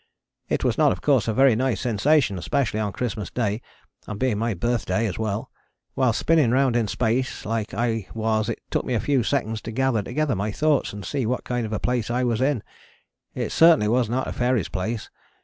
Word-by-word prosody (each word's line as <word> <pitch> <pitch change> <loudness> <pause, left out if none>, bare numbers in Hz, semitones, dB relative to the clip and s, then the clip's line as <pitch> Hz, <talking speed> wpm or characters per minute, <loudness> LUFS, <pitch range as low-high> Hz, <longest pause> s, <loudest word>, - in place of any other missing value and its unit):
It - - 0
was - - 0
not - - +5
of - - -3
course - - +3
a - - +2
very 135 -3 +5
nice 125 -3 0
sensation, 120 -2 +2
especially 125 - -1
on 105 -2 -1
Christmas 105 -3 -4
Day, 110 -2 -1 0.5
and 105 -1 -6
being 125 -5 +1
my 115 -2 -1
birthday 115 +2 0
as 100 -2 -3
well. 110 -1 -3 0.4
While 130 -2 +2
spinning 155 +2 +2
round 130 0 +2
in 115 -3 +1
space 125 +4 -1
like 110 -3 -2
I 115 -3 -1
was 110 0 0
it 115 - -4
took - - 0
me 125 - -2
a - - +1
few 140 0 +1
seconds 115 -3 -1
to 115 - -6
gather 130 -2 +1
together 135 +5 -1
my 105 +3 -2
thoughts 150 +4 +1
and 105 -1 -8
see 135 -6 -2
what 125 +2 -1
kind 120 -2 -2
of - - -9
a 110 - -1
place 120 -3 -1
I 125 +2 0
was 120 -1 0
in. 130 -5 +1 0.7
It - - -3
certainly 160 -10 +5
was 120 -1 +2
not 130 +2 -1
a - - -4
fairy's 120 -6 0
place. 110 +4 -4
115 Hz, 215 wpm, -24 LUFS, 110-130 Hz, 0.7 s, not